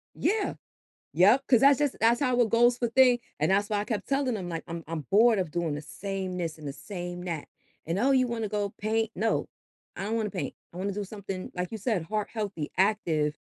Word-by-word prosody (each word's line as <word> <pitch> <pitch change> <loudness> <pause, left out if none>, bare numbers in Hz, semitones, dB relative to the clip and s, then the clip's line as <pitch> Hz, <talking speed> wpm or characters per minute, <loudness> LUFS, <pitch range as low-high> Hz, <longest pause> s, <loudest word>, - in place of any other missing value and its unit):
Yeah. 420 0 0 0.6
Yep, 235 +9 +5
'cause 240 -4 +5
that 280 0 +7
just 290 -2 0
that's 230 +3 +4
how 255 -3 +2
it 230 - +4
goes 240 +1 +4
for 240 - +1
thing, 250 0 +5 0.2
and 155 - +2
that's 205 +2 +2
why 205 - +1
I - - -2
kept 210 -4 -3
telling 275 -3 +1
them, 185 -4 -4
like, 165 -1 -4
"I'm 170 -1 -5
I'm 165 -1 -3
bored 220 +1 +5
of 180 -5 -1
doing 165 -2 -1
the 145 - -4
same 190 +1 -5
this 165 -3 -3
and 150 -2 -7
the - - -4
same 175 0 -6
that," 165 -4 -4 0.4
and, 170 +4 -1
"Oh, 265 +5 +3
you 255 -2 +4
wanna 230 -2 -2
go 205 -1 -1
paint?" 220 +1 0
"No. 225 +1 0 0.5
I 195 - -4
don't 225 +2 -1
wanna 215 -2 -1
paint. 185 - -4 0.2
I - - -13
wanna 195 +2 -2
do 205 +1 -3
something," 195 -2 -6
like 180 +3 -3
you 220 - -4
said, 210 -5 0
heart 210 +4 -2
healthy, 200 -9 -4
active 165 -7 +1
205 Hz, 230 wpm, -28 LUFS, 180-230 Hz, 0.6 s, that